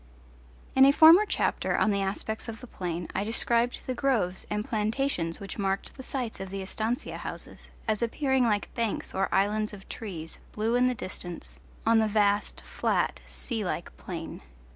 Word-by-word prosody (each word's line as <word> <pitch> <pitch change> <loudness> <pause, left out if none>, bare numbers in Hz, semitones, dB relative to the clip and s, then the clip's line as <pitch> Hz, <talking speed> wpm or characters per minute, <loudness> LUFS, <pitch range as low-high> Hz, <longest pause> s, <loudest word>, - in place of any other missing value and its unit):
In 265 - +8
a 275 - +9
former 325 +8 +8
chapter - - 0
on 215 - +3
the 200 -1 +1
aspects 205 +4 -2
of 225 0 -6
the - - -9
plain 175 -6 -4
I 195 - 0
described 235 +2 +1
the 255 - -1
groves 235 -8 0
and 210 0 -1
plantations, 215 -6 0
which 200 +1 -7
marked 195 0 -1
the 265 - -8
sites 255 -3 -3
of 190 0 -5
the 195 0 -4
estancia 220 +5 -2
houses, - - -6 0.2
as 215 -1 +1
appearing 265 +2 +2
like 210 -3 0
banks 230 -3 -2
or 195 0 +1
islands 210 +2 +1
of 195 -1 -11
trees, 170 -8 -6
blue 220 +2 0
in 250 +1 +4
the 250 - +1
distance, 175 -4 -6 0.3
on 225 0 +5
the 220 - +3
vast 205 -1 +2
flat - - 0
sea 225 -4 -3
like 175 -2 -4
plain. 165 -3 -6
215 Hz, 175 wpm, -28 LUFS, 195-245 Hz, 0.3 s, a